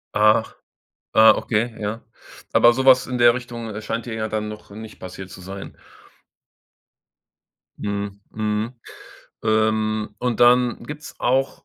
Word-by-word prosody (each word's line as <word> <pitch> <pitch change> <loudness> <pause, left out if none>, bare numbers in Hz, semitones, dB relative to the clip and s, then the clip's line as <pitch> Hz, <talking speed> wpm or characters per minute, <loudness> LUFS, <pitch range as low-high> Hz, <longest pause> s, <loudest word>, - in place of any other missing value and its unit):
Ach, 110 +1 +3 0.6
ah, 110 0 +8
okay, 115 +1 -1
ja. 105 +2 -4 0.5
Aber 120 - +6
so 130 +1 -1
was 130 -1 +6
in 125 - -3
der 120 -1 +6
Richtung, 120 -3 -6
äh, 110 - -5
scheint 115 +2 -4
dir 120 - -6
ja 110 -1 -3
dann 105 0 -3
noch 105 0 -9
nicht 110 +2 -10
passiert 95 +1 -9
zu 95 - -11
sein? 95 +2 -8 2.1
Mhm, 100 -1 -4
mhm, 110 +2 -2 0.7
ähm, 110 0 +1
und 125 -3 -2
dann 120 0 +4
gibt's 150 +1 -9
auch, 130 +2 0
110 Hz, 140 wpm, -22 LUFS, 105-120 Hz, 2.1 s, ah